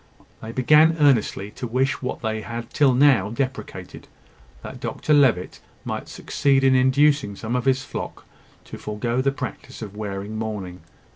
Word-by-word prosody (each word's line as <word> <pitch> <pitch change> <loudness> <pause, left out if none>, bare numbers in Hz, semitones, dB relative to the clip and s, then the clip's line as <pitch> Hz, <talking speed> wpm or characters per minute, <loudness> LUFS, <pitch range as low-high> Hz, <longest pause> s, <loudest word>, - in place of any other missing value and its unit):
They 110 - -7
began 150 +6 +4
earnestly 115 -8 +2
to 125 - -6
wish 130 +4 0
what 130 -1 -4
they 110 0 -2
had 115 +1 -7
till 135 -4 +3
now 130 -7 +4
deprecated 130 +2 -5 0.6
that - - -8
Dr 155 - -1
Levitt 130 -11 +3 0.3
might - - -5
succeed 135 -2 +1
in 135 0 +5
inducing 130 -3 +3
some 115 +4 -4
of 125 - -1
his 130 0 +2
flock - - -7 0.4
to - - -10
forego 115 +4 -2
the 135 +1 +1
practice 130 -2 -7
of 105 -1 -9
wearing 105 0 -5
mourning. 100 -5 -5
125 Hz, 155 wpm, -23 LUFS, 110-135 Hz, 0.6 s, in